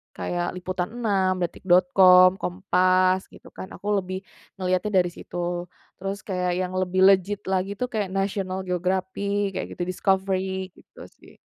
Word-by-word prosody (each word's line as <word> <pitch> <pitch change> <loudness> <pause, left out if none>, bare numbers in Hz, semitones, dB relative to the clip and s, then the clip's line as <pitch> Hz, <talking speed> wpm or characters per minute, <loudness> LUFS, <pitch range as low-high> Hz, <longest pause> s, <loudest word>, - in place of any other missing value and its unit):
kayak 90 - -3
liputan6, 185 +1 -1
detik.com, 185 +1 +5
Kompas, 185 0 +2
gitu - - -15
kan. 190 - -8
Aku 205 0 -1
lebih 185 0 -5 0.4
ngeliatnya 185 +2 +1
dari 175 - -4
situ. 175 0 -5 0.3
Terus 195 +1 -4
kayak 180 -2 -1
yang 185 0 -3
lebih 185 0 0
legit 195 +1 +2
lagi 190 +1 -1
tuh 250 - -1
kayak 210 -4 -2
National 195 -1 -2
Geographic, 190 +2 -1
kayak - - -3
gitu, - - -7
Discovery, 190 0 -1
gitu - - -15
sih. - - -20
185 Hz, 135 wpm, -24 LUFS, 180-195 Hz, 0.4 s, detik.com